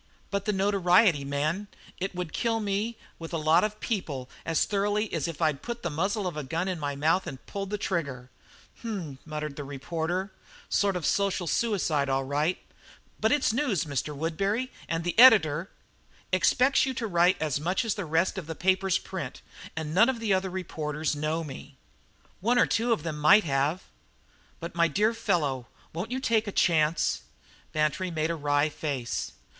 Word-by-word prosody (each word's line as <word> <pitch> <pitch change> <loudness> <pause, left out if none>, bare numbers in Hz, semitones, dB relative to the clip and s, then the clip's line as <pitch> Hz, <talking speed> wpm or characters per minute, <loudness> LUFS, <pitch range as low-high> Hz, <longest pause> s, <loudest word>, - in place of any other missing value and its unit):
"But 200 0 -1
the 210 - +2
notoriety, 190 -4 +3
man! 150 +8 -1 0.3
It 190 0 -3
would 180 -3 -4
kill 230 -2 0
me 210 +2 -2 0.2
with 165 +1 -8
a - - +1
lot 155 +1 +4
of 215 0 -2
people 145 - -3 0.2
as 165 -2 +2
thoroughly 205 +1 0
as 165 -3 -1
if 165 0 -4
I'd 150 -3 +1
put 235 0 -6
the 175 - -2
muzzle 195 +7 -1
of 180 - -3
a 150 - -3
gun 165 +7 -2
in 185 -3 -2
my 145 -1 -2
mouth 160 +6 +1
and 135 -2 -8
pulled 195 -1 -5
the 210 - -2
trigger." 140 -11 -3 0.5
"H - - -15
m!" 175 -12 -4
muttered 150 -2 -5
the 145 - -4
reporter, 165 +7 -3 0.4
"sort 200 -2 +2
of 175 -4 -2
social 195 -2 +1
suicide, 170 -9 +1
all 135 0 +1
right. 145 +6 0 0.6
But 220 - +2
it's 290 -6 +2
news, 240 - +1
Mr. 145 0 -3
Woodbury, 195 - -1 0.2
and 165 0 -1
the 175 - -1
editor 185 - +7 0.3
" - - -31
"Expects 250 +9 +4
you 265 -2 -1
to 235 - -2
write 175 -2 +3
as 150 -3 0
much 180 +9 0
as 220 - +1
the 205 - -4
rest 165 +5 +1
of 165 - -9
the 160 - -5
papers 190 +1 +2
print 165 -10 -6 0.3
and 160 -1 -4
none 225 +8 +6
of 255 -3 -1
the 220 -3 +1
other 190 0 0
reporters 155 -4 -3
know 155 +2 -1
me." 140 -1 -9 0.6
"One 235 +6 +2
or 245 - +6
two 230 +2 0
of 225 - +1
them 155 -3 -4
might 195 +8 +7
have." 145 +4 0 0.8
"But 170 0 -6
my 170 0 +3
dear 215 +6 +2
fellow 140 - 0 0.3
won't 175 +7 -4
you 255 +1 -2
take 225 -4 +1
a - - -2
chance?" 155 -3 +2 0.5
Bantry 155 +4 0
made 160 -1 -1
a - - -1
wry 145 -1 +2
face. 140 -5 -3
170 Hz, 190 wpm, -28 LUFS, 150-205 Hz, 0.8 s, editor